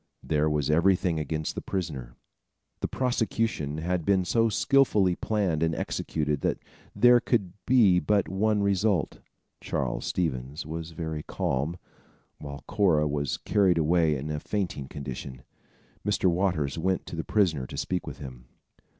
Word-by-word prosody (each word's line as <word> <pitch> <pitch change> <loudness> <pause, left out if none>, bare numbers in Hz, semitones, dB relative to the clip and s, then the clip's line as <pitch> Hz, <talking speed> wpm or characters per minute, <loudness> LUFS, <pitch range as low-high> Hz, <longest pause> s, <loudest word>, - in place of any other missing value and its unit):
There 75 0 +1
was 75 -1 0
everything 85 0 +3
against 75 +1 -3
the - - -5
prisoner. 75 -11 -4 0.6
The - - -1
prosecution 115 - -1
had 85 +2 -1
been 95 +1 +2
so 115 +4 +2
skillfully 105 -6 +3
planned 95 -8 0
and 80 -1 +1
executed, 75 -2 -2
that - - 0 0.4
there 120 0 +6
could 100 -8 0
be 110 -8 +5
but 100 0 +1
one 105 +2 +1
result. 100 -2 +1 0.4
Charles - - -2
Stevens 70 -4 -2
was 80 +1 -5
very 80 -1 -4
calm, 75 +4 -2 0.6
while 70 -1 -8
Cora 90 -8 +3
was 75 -1 -1
carried 95 -4 +2
away 80 -1 +3
in 75 +4 -4
a 75 - -2
fainting 90 -8 -3
condition. 65 -2 -7 0.6
Mr. - - 0
Waters 85 -5 0
went 95 +2 0
to - - -7
the 80 - -3
prisoner 80 -12 +1
to - - -8
speak 90 -1 -2
with - - -6
him. 65 -3 -10
85 Hz, 145 wpm, -27 LUFS, 75-100 Hz, 0.6 s, there